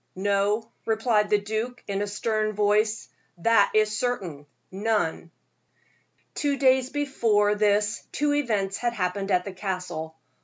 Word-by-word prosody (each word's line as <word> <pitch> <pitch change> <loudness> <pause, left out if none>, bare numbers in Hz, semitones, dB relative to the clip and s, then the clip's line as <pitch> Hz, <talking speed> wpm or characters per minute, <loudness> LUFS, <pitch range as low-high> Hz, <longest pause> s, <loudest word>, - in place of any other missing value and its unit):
"No," 205 +3 0 0.2
replied 220 -1 +2
the 210 - +4
duke, 220 +4 -4
in 200 -1 -2
a 205 - -1
stern 215 +1 -1
voice, 210 +1 +1 0.3
"that 205 +3 +4
is 215 0 +3
certain 185 - -3 0.2
none." 200 -4 -1 1.0
Two 285 -2 0
days 260 -1 +3
before 230 -8 +1
this 210 0 +1
two 295 0 +1
events 210 -9 0
had 240 -1 -1
happened 195 -1 -2
at 180 -2 +2
the 195 - -6
Castle. 180 -4 -4
210 Hz, 130 wpm, -26 LUFS, 195-230 Hz, 1.0 s, the